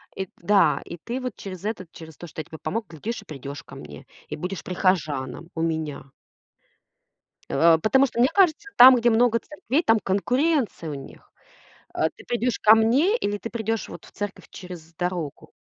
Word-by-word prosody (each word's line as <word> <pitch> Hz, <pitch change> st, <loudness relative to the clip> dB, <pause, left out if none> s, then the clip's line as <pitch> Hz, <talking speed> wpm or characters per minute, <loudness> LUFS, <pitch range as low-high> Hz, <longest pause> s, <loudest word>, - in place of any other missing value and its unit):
и 190 Hz, -1 st, -4 dB
Да, 200 Hz, +3 st, +3 dB
и 170 Hz, -, -8 dB
ты 250 Hz, +2 st, -4 dB
вот 250 Hz, -4 st, -4 dB
через 185 Hz, -2 st, -8 dB
этот 205 Hz, -5 st, -4 dB
через 160 Hz, -2 st, -12 dB
то, 175 Hz, -, -9 dB
что 155 Hz, -, -6 dB
я -, -, -11 dB
тебе 160 Hz, -, -10 dB
помог, 225 Hz, -1 st, -3 dB
глядишь 210 Hz, -, -5 dB
и -, -, -18 dB
придешь 140 Hz, -2 st, -8 dB
ко -, -, -13 dB
мне, 75 Hz, -1 st, -11 dB, 0.2 s
и -, -, -4 dB
будешь 180 Hz, +4 st, -5 dB
прихожаном 165 Hz, -6 st, -1 dB
у 160 Hz, -, -2 dB
меня. 155 Hz, -4 st, -3 dB, 1.4 s
А, 165 Hz, +3 st, +5 dB
потому 265 Hz, +10 st, +3 dB
что 235 Hz, -, -8 dB
мне 250 Hz, -, +5 dB
кажется, 390 Hz, +1 st, +3 dB
там, 255 Hz, +1 st, +10 dB
где 240 Hz, 0 st, +3 dB
много 230 Hz, 0 st, +3 dB
церквей, 295 Hz, +1 st, -2 dB
там 225 Hz, -8 st, +4 dB
конкуренция 245 Hz, -, 0 dB
у 145 Hz, -, -4 dB
них. 135 Hz, -1 st, -12 dB, 0.6 s
А, -, -, +1 dB
ты -, -, -17 dB
придешь 240 Hz, 0 st, -1 dB
ко 215 Hz, +1 st, +8 dB
мне 265 Hz, -, +3 dB
или 205 Hz, -, -2 dB
ты 230 Hz, -, -7 dB
придешь 225 Hz, -1 st, -2 dB
вот -, -, -10 dB
в -, -, -16 dB
церковь 205 Hz, -1 st, -6 dB
через 170 Hz, -3 st, -10 dB
дорогу? 175 Hz, -4 st, -4 dB
200 Hz, 190 wpm, -24 LUFS, 160-240 Hz, 1.4 s, там